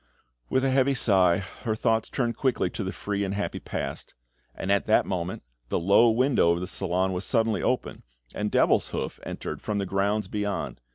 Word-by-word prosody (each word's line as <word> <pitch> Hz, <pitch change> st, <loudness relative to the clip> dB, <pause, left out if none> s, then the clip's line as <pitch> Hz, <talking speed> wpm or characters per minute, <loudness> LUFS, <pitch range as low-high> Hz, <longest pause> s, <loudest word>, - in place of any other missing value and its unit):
With 130 Hz, +1 st, +1 dB
a 135 Hz, -, +2 dB
heavy 135 Hz, +1 st, +3 dB
sigh, 95 Hz, -7 st, +4 dB, 0.2 s
her 110 Hz, -3 st, -1 dB
thoughts 110 Hz, 0 st, +1 dB
turned 120 Hz, -3 st, -1 dB
quickly 130 Hz, -3 st, 0 dB
to 105 Hz, -, -4 dB
the 95 Hz, -, -3 dB
free 100 Hz, +2 st, -3 dB
and 100 Hz, 0 st, -2 dB
happy 100 Hz, -, -3 dB
past; -, -, -5 dB, 0.4 s
and 95 Hz, -, -2 dB
at 100 Hz, -, +2 dB
that 110 Hz, -, +4 dB
moment, 90 Hz, -1 st, -3 dB, 0.3 s
the -, -, 0 dB
low 100 Hz, +7 st, +5 dB
window 125 Hz, -5 st, +3 dB
of 85 Hz, 0 st, +2 dB
the 90 Hz, -, -3 dB
salon 95 Hz, 0 st, -1 dB
was 90 Hz, +1 st, -2 dB
suddenly 115 Hz, -4 st, +1 dB
opened, 125 Hz, -, -1 dB, 0.3 s
and 105 Hz, 0 st, -2 dB
Devilshoof -, -, +1 dB
entered -, -, -6 dB
from 105 Hz, -, -2 dB
the 100 Hz, -, -1 dB
grounds 100 Hz, +3 st, 0 dB
beyond. 100 Hz, -, -3 dB
105 Hz, 185 wpm, -26 LUFS, 95-115 Hz, 0.4 s, low